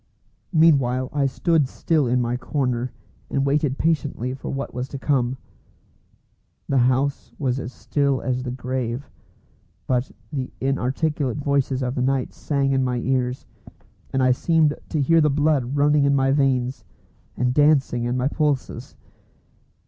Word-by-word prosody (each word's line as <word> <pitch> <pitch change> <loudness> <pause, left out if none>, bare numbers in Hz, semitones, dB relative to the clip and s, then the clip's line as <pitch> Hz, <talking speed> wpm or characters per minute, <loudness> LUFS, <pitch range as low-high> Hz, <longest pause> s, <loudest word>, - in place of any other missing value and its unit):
Meanwhile 135 -7 +3
I 140 -1 +2
stood 160 +1 +1
still 150 +1 0
in 125 +1 +2
my 120 +1 -1
corner, 125 -1 -2 0.4
and 135 0 0
waited 140 -1 +1
patiently 145 -6 -1
for 130 - -7
what 135 0 -4
was 125 +1 -3
to 140 - -6
come. 130 -2 0 1.3
The 135 - +2
house 130 +3 +1
was 130 -2 -1
as 125 - -6
still 140 -1 0
as 130 -1 -2
the 125 - -4
grave, 125 0 -4 0.7
but 125 0 0 0.2
the 130 -3 -3
inarticulate 135 +1 -1
voices 140 -2 0
of 125 0 -1
the 130 - -2
night 130 0 0
sang 140 -2 -1
in 135 -1 +2
my 125 -1 0
ears, 125 0 -1 0.7
and 135 -1 +1
I 130 - +4
seemed 155 +3 +2 0.2
to 155 - -1
hear 165 +4 +4
the 150 - +4
blood 145 -2 +1
running 145 0 +4
in 140 0 +3
my 135 0 +2
veins 130 -2 +1 0.5
and 125 0 +1
dancing 140 -4 +3
in 120 +1 -1
my 125 +1 +1
pulses. 145 -2 -2
135 Hz, 150 wpm, -23 LUFS, 125-145 Hz, 1.3 s, I